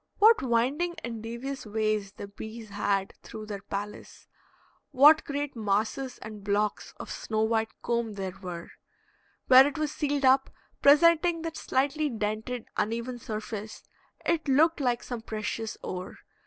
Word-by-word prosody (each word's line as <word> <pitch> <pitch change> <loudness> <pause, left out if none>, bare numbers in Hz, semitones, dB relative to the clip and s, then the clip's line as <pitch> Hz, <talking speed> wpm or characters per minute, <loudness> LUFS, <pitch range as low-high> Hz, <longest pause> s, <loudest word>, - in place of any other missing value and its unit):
What 440 +2 +6
winding 265 +8 +1
and 230 -2 -5
devious 240 +5 -5
ways 215 -2 -1
the 200 - -8
bees 220 +2 -9
had 200 -1 -1
through 215 -1 -8
their 205 -2 -6
palace! 205 +1 -7 0.6
What 300 +4 +7
great 285 -1 -3
masses 220 +5 -1
and 215 -2 -9
blocks 205 +1 -1
of - - -7
snow 220 0 -1
white 220 0 +1
comb 235 -2 -1
there 190 -2 -4
were! 175 -3 -7 0.7
Where 260 +2 +8
it 290 - -4
was 305 -1 -1
sealed 285 -2 -1
up, 265 +1 +5 0.3
presenting 330 +3 +5
that 325 -1 -4
slightly 290 +3 0
dented, 220 +1 -3
uneven 235 +3 -2
surface, 215 -1 -6 0.4
it 320 -2 0
looked 310 +5 +4
like 245 -3 0
some 245 -2 -5
precious 220 0 -4
ore. 185 0 -6
230 Hz, 140 wpm, -28 LUFS, 215-280 Hz, 0.7 s, Where